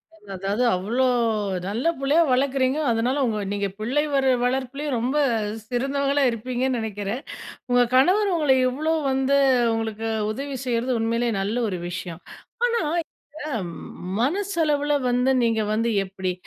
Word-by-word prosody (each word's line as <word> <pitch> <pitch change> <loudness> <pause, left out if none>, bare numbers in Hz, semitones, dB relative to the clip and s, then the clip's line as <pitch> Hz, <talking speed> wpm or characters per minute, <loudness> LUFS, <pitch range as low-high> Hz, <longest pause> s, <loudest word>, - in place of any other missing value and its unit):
அது 210 -1 -23
அதாவது 195 +5 -1
அவ்ளோ 220 +8 0 0.6
நல்ல 215 +5 -2 0.2
புள்ளையா 285 +4 +3
வளர்க்கறீங்க. 265 +1 +1
அதனால 245 +5 0
உங்க 220 -3 -1
நீங்க 200 0 -1
பிள்ளை 255 +7 0
வர 270 -1 +2 0.2
வளர்ப்புலயும் 265 +3 -1
ரொம்ப 255 +5 -1 0.5
சிறந்தவங்களா 275 +3 0
இருப்பீங்கன்னு 250 +2 -2
நினைக்கிறேன். 210 +2 -4 0.5
உங்க 245 0 +5
கணவர் 375 +10 +4
உங்கள 295 -5 +3
இவ்ளோ 310 +5 -1 0.2
வந்து 270 +1 +2 0.4
உங்களுக்கு 225 0 -3 0.2
உதவி 275 +4 -5
செய்றது 245 +1 0
உண்மையிலே 230 +1 0
நல்ல 205 +4 -2
ஒரு 185 -3 -3
விஷயம். 175 -1 -6 0.4
ஆனா, 470 -3 +1 0.2
இந்த - - -72 1.1
மனசளவுல 300 -2 +1 0.2
வந்து 250 +2 +2
நீங்க 225 -1 +2
வந்து 230 +2 +1
எப்பிடி? 190 -1 -3
250 Hz, 130 wpm, -24 LUFS, 225-280 Hz, 1.1 s, உங்க